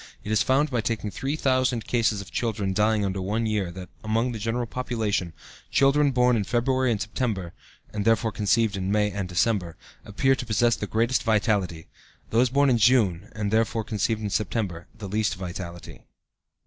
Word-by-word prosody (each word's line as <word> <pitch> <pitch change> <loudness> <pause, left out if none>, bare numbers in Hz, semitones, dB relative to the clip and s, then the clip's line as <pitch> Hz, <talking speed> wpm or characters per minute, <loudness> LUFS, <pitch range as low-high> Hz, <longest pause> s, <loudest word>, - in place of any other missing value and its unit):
It 105 - -5
is 110 - +3
found 140 +3 +2
by 120 -3 +1
taking 110 -1 -2
3000 130 - 0
cases 115 -4 +1
of 95 - -12
children 105 -5 -1
dying 105 +1 +2
under 95 0 -2
one 105 +5 -1
year 105 -4 0
that, 90 0 -9
among 115 +3 0
the 115 - -5
general 115 +3 -1
population, 110 -7 -2 0.4
children 140 +1 +4
born 125 -2 +3
in 110 - +1
February 130 +4 +1
and 110 -3 0
September 105 -5 -3 0.4
(and 105 -1 -2
therefore 115 +1 +2
conceived 105 0 +1
in 95 0 -2
May 105 0 +2
and 100 -3 -4
December) 90 -1 0 0.3
appear 135 +6 +1
to 135 - -3
possess 115 +1 +3
the 105 - -5
greatest 115 +5 +1
vitality, 105 -6 +1
and - - -28
those 120 +3 +3
born 140 +1 +3
in 120 - +3
June, 105 -5 +3
and, 105 -2 -2
therefore, 115 +1 +1
conceived 110 0 -1
in 105 - -2
September, 100 -5 -2
the 105 - -7
least 105 +2 0
vitality. 85 -2 -7
110 Hz, 180 wpm, -25 LUFS, 100-120 Hz, 0.4 s, children